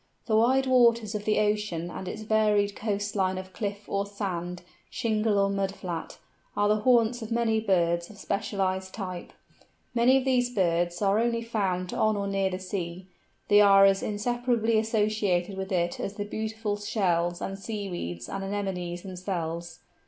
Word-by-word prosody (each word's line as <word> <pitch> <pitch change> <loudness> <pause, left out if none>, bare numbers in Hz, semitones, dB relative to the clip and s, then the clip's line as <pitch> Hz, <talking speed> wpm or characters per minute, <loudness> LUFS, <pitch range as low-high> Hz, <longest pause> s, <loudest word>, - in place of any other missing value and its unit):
The 220 - +1
wide 255 +4 +4
waters 235 -4 +4
of 210 -1 -4
the 215 - +2
ocean 210 -5 0
and 185 - -6
its 215 +4 -5
varied 210 -2 +2
coast 205 -1 -2
line 190 -1 +1
of 185 0 -8
cliff 205 -2 -4
or 200 0 -1
sand, 180 -3 -4 0.3
shingle 220 -3 0
or 200 0 +3
mud 195 0 -1
flat, 175 -3 -6 0.4
are 205 0 +3
the 210 +1 +3
haunts 235 +1 +3
of 220 +1 -7
many 230 -1 +2
birds 170 -5 +1
of 210 - -13
specialised 190 -2 -2
type. 185 -4 -6 0.6
Many 245 +2 +5
of 265 - -1
these 250 -2 +2
birds 175 -4 0
are 200 +2 +3
only 230 0 0
found 190 -6 -1
on 215 -1 +2
or 200 - -2
near 195 -1 0
the 185 - -3
sea; 185 -1 -5 0.4
they 205 0 +6
are 195 -1 +7
as 195 0 +4
inseparably 230 +1 0
associated 210 -4 0
with 190 0 -5
it 175 -2 0
as 195 - -4
the 205 -1 -3
beautiful 215 0 -3
shells 175 -5 0
and 195 0 -5
seaweeds 190 - -5
and 195 0 -4
anemones 190 -3 -3
themselves. 175 -3 -5
200 Hz, 165 wpm, -27 LUFS, 185-220 Hz, 0.6 s, are